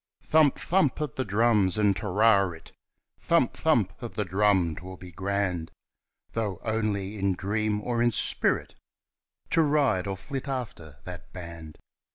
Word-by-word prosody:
Thump! 155 Hz, -3 st, +4 dB
thump! 170 Hz, -7 st, +1 dB
of 150 Hz, -5 st, -3 dB
the 130 Hz, -, -2 dB
drums 105 Hz, -3 st, +2 dB
and 105 Hz, -2 st, +3 dB
"Te 105 Hz, -, -5 dB
ri 100 Hz, 0 st, +4 dB
rit," 80 Hz, -1 st, -12 dB, 0.5 s
Thump! -, -, +2 dB
thump! -, -, +1 dB
of -, -, -7 dB
the 105 Hz, -, -1 dB
drum 95 Hz, -3 st, +2 dB
'twill 95 Hz, +1 st, -9 dB
be 90 Hz, 0 st, -11 dB
grand, 95 Hz, -2 st, -2 dB, 0.6 s
Though 105 Hz, -6 st, -2 dB
only 105 Hz, -2 st, -2 dB
in 95 Hz, -1 st, +1 dB
dream 105 Hz, +2 st, -1 dB
or 120 Hz, +1 st, -1 dB
in 120 Hz, -, +4 dB
spirit 115 Hz, -, 0 dB, 0.8 s
To 165 Hz, -, +4 dB
ride 145 Hz, -, +2 dB
or 95 Hz, -1 st, -3 dB
flit 135 Hz, +8 st, -6 dB
after 110 Hz, -, -5 dB
that 90 Hz, -1 st, -9 dB
band 85 Hz, -3 st, -9 dB
100 Hz, 155 wpm, -27 LUFS, 95-115 Hz, 0.8 s, Thump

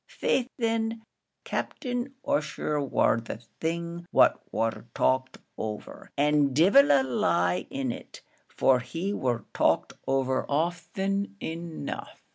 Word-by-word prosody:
Faix 255 Hz, -1 st, 0 dB
thin, 225 Hz, -1 st, 0 dB, 0.4 s
Captain 250 Hz, +1 st, -3 dB
Ussher 150 Hz, 0 st, 0 dB
war 130 Hz, -4 st, +2 dB
the 110 Hz, -, -6 dB, 0.2 s
thing 170 Hz, +1 st, -3 dB
what -, -, +5 dB
war 115 Hz, +1 st, -1 dB
talked 130 Hz, 0 st, +1 dB, 0.2 s
over; 105 Hz, -1 st, -6 dB
and 145 Hz, -2 st, +3 dB
divil 200 Hz, -, +6 dB
a 135 Hz, -1 st, +5 dB
lie 90 Hz, -8 st, +1 dB
in 135 Hz, -2 st, -2 dB
it, -, -, -10 dB, 0.2 s
for 130 Hz, -1 st, +3 dB
he 170 Hz, +10 st, -3 dB
war 125 Hz, -, -1 dB
talked -, -, +2 dB
over 130 Hz, -1 st, +1 dB
ofthen 190 Hz, +6 st, -1 dB
enough." 165 Hz, 0 st, -6 dB
150 Hz, 115 wpm, -28 LUFS, 130-195 Hz, 0.4 s, divil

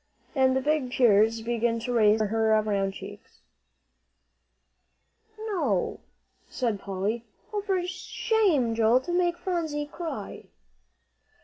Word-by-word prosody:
And 260 Hz, -1 st, +3 dB
the -, -, 0 dB
big 290 Hz, -2 st, 0 dB
tears 225 Hz, -2 st, +4 dB
began 230 Hz, 0 st, 0 dB
to 245 Hz, +1 st, -3 dB
race 215 Hz, -3 st, +5 dB
over 215 Hz, -, +2 dB
her 220 Hz, -1 st, +3 dB
round 195 Hz, -2 st, -1 dB
cheeks. -, -, -11 dB, 2.0 s
"No," 345 Hz, -, -1 dB, 0.5 s
said 230 Hz, -5 st, -1 dB
Polly. 200 Hz, +4 st, -3 dB, 0.3 s
"Oh, 415 Hz, -, -1 dB
for 380 Hz, -3 st, -1 dB
shame, 375 Hz, -, +1 dB
Joel, 225 Hz, +2 st, +4 dB
to 350 Hz, -, -5 dB
make 350 Hz, -1 st, +1 dB
Phronsie 330 Hz, -5 st, -2 dB
cry!" 295 Hz, -, -6 dB
245 Hz, 115 wpm, -27 LUFS, 220-345 Hz, 2.0 s, race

